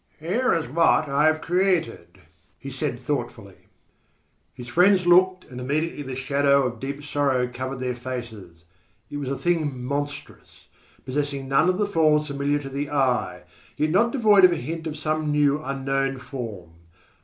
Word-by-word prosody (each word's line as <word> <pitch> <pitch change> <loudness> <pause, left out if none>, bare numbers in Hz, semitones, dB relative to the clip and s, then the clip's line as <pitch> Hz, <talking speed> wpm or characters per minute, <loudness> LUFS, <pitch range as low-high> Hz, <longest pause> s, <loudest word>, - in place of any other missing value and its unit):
"Here 210 +11 0
is 165 -5 -2
what 155 +2 +3
I 140 +2 +2
have 155 0 +1
created," 180 -1 -1 0.4
he - - -8
said - - -3
thoughtfully. - - -5 0.8
His 125 +7 -11
friends 180 +7 +4
looked, 185 +1 +4
and 125 -2 -9
immediately 150 +4 -2
the 135 -2 -6
shadow 140 +1 +2
of 120 -2 -4
deep 140 +3 -6
sorrow 140 -4 0
covered 130 +2 -6
their 125 -1 -1
faces. 115 -9 -8 0.5
It 145 - -4
was 140 -2 -4
a 135 - -2
thing 155 -7 -1
monstrous, 145 +2 -6 0.4
possessing 140 0 -3
none 135 +6 +3
of 185 - +1
the 210 - +1
forms 155 -6 +2
familiar 140 0 -1
to 140 -2 -7
the 140 +1 -4
eye, 125 -11 0 0.3
yet 155 +1 0
not 220 +7 +3
devoid 215 -7 +4
of 180 - +8
a - - +1
hint 160 +5 -5
of 155 -1 -5
some 155 0 -1
new 145 0 +2
unknown 135 -1 -2
form. 110 - -7
145 Hz, 165 wpm, -24 LUFS, 130-160 Hz, 0.8 s, of